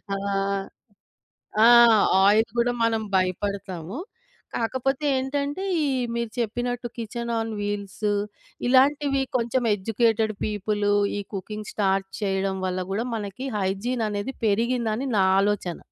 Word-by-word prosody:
ఆ! - - -2 1.5
ఆ! - - +8 0.6
ఆయిల్ 215 +3 +5
గూడా 240 +1 +3
మనం 225 -1 +2
భయపడతాము. 185 0 -2 0.6
కాకపోతే 260 +5 -1
ఏంటంటే 280 +6 -2 0.2
ఈ - - +1 0.3
మీరు 235 -1 -2
చెప్పినట్టు 240 +2 -2
కిచెన్ 235 +1 -4
ఆన్ 225 0 -3
వీల్స్ 205 0 -3 0.6
ఇలాంటివి 275 +1 +3 0.2
కొంచెం 240 +2 0
ఎడ్యుకేటెడ్ 220 +2 +1
పీపుల్ 210 0 -1 0.3
ఈ - - -2
కుకింగ్ 210 +2 -6
స్టార్ట్ 195 -2 +1
చేయడం 195 -1 0
వల్ల 185 0 -1
గూడా 215 +5 -1
మనకి 210 +5 -5
హైజీన్ 205 +5 -1
అనేది 205 +6 -3
పెరిగిందని 235 +3 0
నా 190 - +4 0.2
ఆలోచన. 200 -4 -1
220 Hz, 115 wpm, -25 LUFS, 200-245 Hz, 1.5 s, ఆ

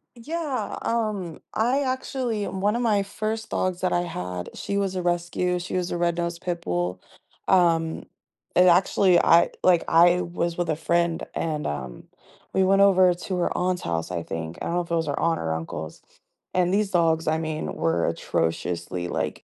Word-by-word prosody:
Yeah, 300 +3 -3
um, 210 -8 -2
I 250 +6 +1
actually 255 -4 -2
one 195 +3 0
of 240 - -1
my 215 -4 +2
first 215 +3 -4
dogs 185 -1 -1
that 185 - 0
I 175 - +2
had, 90 - -5
she 200 - -3
was 195 -2 -1
a 185 - -1
rescue, 175 +1 0
she 175 +1 -5
was 180 -1 -1
a 175 - -2
red 170 0 0
nosed 170 0 -3
pit 175 -1 -3
bull, 90 +1 -2 0.5
um, 165 -3 +3 0.5
and, 180 +1 +5
actually, 180 +1 +4
I 170 +1 +5
like, 180 -2 +4
I 175 +2 +5
was 170 -1 -2
with 175 -2 -1
a 155 - +1
friend, 170 +1 0
and, 155 -2 -2
um, 65 -4 -5 0.5
we 190 - +3
went 195 +1 +4
over 185 -2 +6
to 180 +2 -5
her 175 - 0
aunt's 180 0 0
house, 80 +1 -2
I 85 -2 -3
think- 80 +1 -5
I - - -3
don't 170 - -1
know 175 - +2
if 170 - -9
it - - +2
was 165 -1 0
her 145 - -2
aunt 165 0 +1
or 80 -1 -2
uncle's- 80 -1 -6 0.5
and 180 0 +2
these 205 -1 +1
dogs, 165 -2 +2
I 160 +1 +2
mean, 155 -1 -3
were 165 - +1
atrociously, 85 +1 -2
like, - - -3
175 Hz, 190 wpm, -25 LUFS, 160-190 Hz, 0.5 s, over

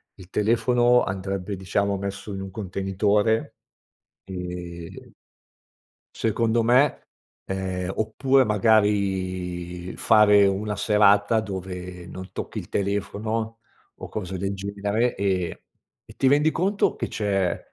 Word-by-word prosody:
il 95 -1 -14
telefono 120 +4 +3
andrebbe, 95 +1 -3
diciamo, 100 +1 -1
messo 100 +1 -5
in 95 - -5
un 95 0 -7
contenitore, 100 +2 0 0.7
ehm 90 -2 -7 1.0
Secondo 115 +1 +1
me, 125 +5 +3 0.4
ehm, 95 -1 -3
oppure 130 +5 +2
magari 95 -4 0
fare 105 -2 +6
una 100 +2 0
serata 105 +1 +4
dove 90 -3 -6
non 95 +1 -9
tocchi - - -5
il - - -10
telefono 110 +3 -2 0.3
o - - -9
cose 95 -3 -4
del 95 +2 -2
genere 100 +4 -1
e 95 -3 -1 0.5
e - - -14
ti 135 - +2
rendi 145 +3 +4
conto 195 +5 +1
che - - -2
c'è 95 -4 0
100 Hz, 110 wpm, -24 LUFS, 95-110 Hz, 1.0 s, fare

